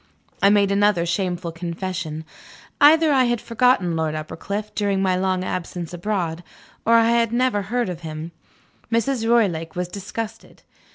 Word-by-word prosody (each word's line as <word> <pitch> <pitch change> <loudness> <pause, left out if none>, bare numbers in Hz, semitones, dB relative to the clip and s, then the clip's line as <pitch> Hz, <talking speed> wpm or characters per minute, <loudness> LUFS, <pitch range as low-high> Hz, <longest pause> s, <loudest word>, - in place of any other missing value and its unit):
I 200 - +6
made 200 -1 +3
another 200 -3 +3
shameful 175 -1 -2
confession. 170 -1 -5 0.6
Either 315 +2 +6
I 260 -2 +4
had 240 -1 0
forgotten 230 -7 +2
Lord 160 -1 -1
Uppercliff, 200 +7 -5
during 200 -2 0
my 190 -1 +2
long 185 0 0
absence 175 -2 -4
abroad, 175 -2 -2 0.4
or 230 - +6
I 230 0 +5
had 235 -1 +2
never 245 -3 +1
heard 240 +4 -1
of 175 -2 -5
him. 160 0 -6 0.6
Mrs. 230 0 0
Roylake 175 -9 +1
was 180 0 -2
disgusted. 215 +4 -7
195 Hz, 150 wpm, -22 LUFS, 170-230 Hz, 0.6 s, I